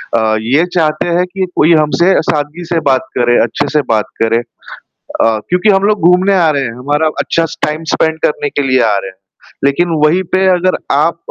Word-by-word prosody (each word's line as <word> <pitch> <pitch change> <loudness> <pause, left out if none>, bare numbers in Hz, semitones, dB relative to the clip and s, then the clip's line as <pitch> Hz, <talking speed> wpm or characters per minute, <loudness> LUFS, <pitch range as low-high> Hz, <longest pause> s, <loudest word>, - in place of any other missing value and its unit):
अ, 110 -1 +1
ये 140 +9 +1
चाहते 155 -1 0
हैं 175 +1 +1
कि 190 -1 -1
कोई 165 +3 +4
हमसे 160 +4 +2 0.2
सादगी 150 +3 -2
से 165 0 -1
बात 130 0 0
करे, 120 0 +2
अच्छे-से 145 +6 -1
बात 105 -3 0 0.2
करे 115 0 +2 0.6
अ, 110 -1 -2
क्योंकि 180 +4 +2
हम 195 -1 +3
लोग 210 +1 +1
घूमने 185 +2 +3
आ 170 -4 +3
रहे 140 -2 -1
हैं, 115 - -4
हमारा 145 +4 0
अच्छा 165 0 0
स - - -9
टाइम 155 +2 -4
स्पेंड 160 0 0
करने 145 -1 0
के - - -2
लिए 130 -1 +2
आ - - +1
रहे 95 -1 -5
हैं। 95 - -18 0.5
लेकिन 140 +6 +1 0.2
वही 180 +5 +2
पे 190 0 +2
अगर 185 +1 0
आप 160 +4 +1
155 Hz, 200 wpm, -13 LUFS, 130-175 Hz, 0.6 s, कोई